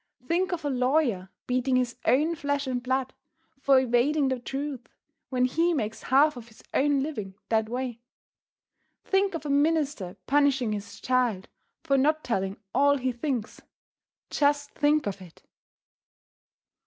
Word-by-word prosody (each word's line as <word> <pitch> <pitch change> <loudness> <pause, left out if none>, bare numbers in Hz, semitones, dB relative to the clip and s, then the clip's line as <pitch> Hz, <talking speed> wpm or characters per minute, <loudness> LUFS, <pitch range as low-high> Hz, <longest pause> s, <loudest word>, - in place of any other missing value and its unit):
Think 355 +6 0
of 335 -4 -3
a - - +1
lawyer 250 -7 +1 0.2
beating 255 +1 +1
his 250 -1 0
own 305 +6 +3
flesh 285 -2 -2
and 255 -2 -2
blood 260 +1 -1 0.5
for 275 -1 +5
evading 260 +3 +2
the 260 -1 -1
truth 270 -1 -5 0.4
when 255 -1 +2
he 330 +6 +1
makes 220 -5 -3
half 285 +3 +4
of 235 -2 -10
his 220 - -18
own 280 0 +2
living 210 -11 -5
that 220 -1 +1
way! 245 -1 -3 1.1
Think 385 -1 +1
of 320 - -6
a - - -3
minister 285 - +1
punishing 275 -4 +2
his 205 +1 -7
child 245 -7 0 0.3
for 275 -1 +2
not 310 +3 +2
telling 195 -3 -2 0.2
all 285 +2 +4
he 260 -1 -1
thinks! 240 -2 -4 0.7
Just 290 0 +1
think 300 0 +2
of 200 -1 -4
it! 175 -3 -15
265 Hz, 145 wpm, -27 LUFS, 240-290 Hz, 1.1 s, for